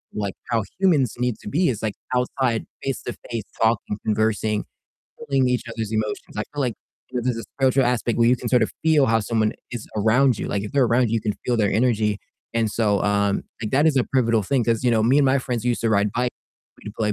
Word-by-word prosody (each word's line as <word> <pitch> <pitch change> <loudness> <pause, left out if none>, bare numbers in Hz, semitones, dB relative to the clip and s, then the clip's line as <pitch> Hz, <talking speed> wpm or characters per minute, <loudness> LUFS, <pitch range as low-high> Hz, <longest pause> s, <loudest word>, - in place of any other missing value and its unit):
like 100 -2 -2 0.2
how 115 -3 +1 0.2
humans 155 - +3
need 125 -2 0
to - - -8
be 175 - +2
is 115 -4 -3
like 110 -2 -1 0.2
outside 125 -2 0 0.2
face-to-face 120 -3 -4 0.2
talking, 110 -2 +1
conversing, 110 -1 0 0.6
feeling 135 -2 +1
each 125 -1 0
other's 115 -2 -4
emotions. 110 -1 -3
I 105 - 0
feel 145 - -4
like, 125 -4 0 0.4
you 130 - -6
know, 120 - 0
there's 125 -2 0
a - - -4
spiritual 135 0 +3
aspect 120 -1 0
where 115 0 +5
you 125 - +4
can - - -5
sort 125 -2 +4
of 110 - 0
feel 155 -4 +4
how 115 -1 +3
someone 110 0 0 0.2
is 120 -3 -5
around 120 +4 +3
you. - - -3
Like 100 - -2
if 105 - -6
they're 140 -2 +4
around 120 +1 +2
you, 110 - -1
you 115 - +1
can 105 -2 -1
feel 125 - +2
their 105 -2 +2
energy, 110 -3 +1 0.4
and 115 -1 +2
so, 105 -3 +1
um, 100 -1 +1 0.2
like 110 - -3
that 145 +4 +4
is 155 -3 +3
a 130 - +3
pivotal 115 -4 +3
thing 130 0 +1
'cause 115 0 +1
you 125 - +4
know, 110 -2 +3
me 130 +5 +4
and 145 - +4
my 135 +1 +3
friends 120 -3 -3
used 120 -1 0
to 115 - +2
ride 100 -1 +2
bi 125 +1 0 0.6
We'd 105 - -6
play 105 -1 0
115 Hz, 240 wpm, -23 LUFS, 110-125 Hz, 0.6 s, where